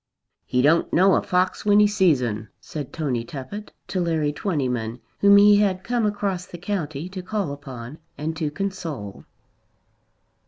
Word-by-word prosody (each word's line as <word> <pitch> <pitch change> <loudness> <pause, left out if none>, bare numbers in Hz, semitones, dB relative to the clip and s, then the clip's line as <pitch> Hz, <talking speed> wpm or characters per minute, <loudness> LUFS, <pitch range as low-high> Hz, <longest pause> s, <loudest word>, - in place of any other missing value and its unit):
"He 125 0 +1
don't 160 +4 +3
know 190 +2 +5
a - - +3
fox 185 +1 0
when 205 0 +5
he 210 - +7
sees 190 -10 +3
'un," 110 -2 -3
said 150 -4 -7
Tony 135 -7 -2
Tuppett 140 - -8 0.2
to 185 - -1
Larry 160 -4 0
Twentyman, 125 - -2 0.2
whom 200 0 +7
he 205 0 +7
had 190 -3 +1
come 240 -1 +1
across 200 -3 -2
the 175 - -9
county 170 -5 -3
to 185 0 -6
call 190 -3 -2
upon 135 -1 -9 0.2
and 155 +3 -3
to 160 -2 -1
console. 155 - -5
170 Hz, 160 wpm, -23 LUFS, 140-195 Hz, 0.2 s, he